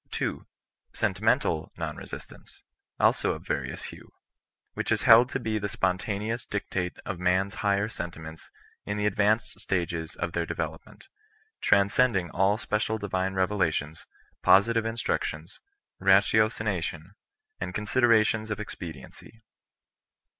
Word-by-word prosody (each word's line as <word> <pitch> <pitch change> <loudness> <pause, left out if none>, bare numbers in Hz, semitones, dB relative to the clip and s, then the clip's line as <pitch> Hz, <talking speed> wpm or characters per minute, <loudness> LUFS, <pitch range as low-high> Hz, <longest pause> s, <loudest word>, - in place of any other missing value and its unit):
2, - - -3 0.5
Sentimental 80 -1 +1
non - - -4
resistance, - - -11 0.4
also - - +2
(^various - - -4
hue; - - -13 0.6
which - - -3
is - - +1
held 120 +2 +8
to 130 - -2
be 110 -3 -1
the 100 0 -3
spontaneous 100 +5 -1
dictate 90 -3 -3
of 90 - -4
man^s 95 +2 +1
higher 100 0 +2
sentiments 80 -6 -7 0.3
in 105 - -3
the 105 - 0
advanced 105 +2 +1
stages 85 -3 -2
of - - -3
their 85 - 0
development, 80 - -6 0.5
transcending 100 -2 +3
all 95 +3 +2
special 110 0 -1
divine 95 -2 -2
revelations, 85 -5 -1 0.3
positive 115 +3 +4
in 115 - -3
structions, 80 -7 -3 0.4
ratiocination, 100 -3 +2 0.5
and - - -4
considerations 110 -1 +2
of 105 - -2
expedi 85 -9 -7
ency. 115 0 -17
100 Hz, 120 wpm, -27 LUFS, 90-110 Hz, 0.6 s, held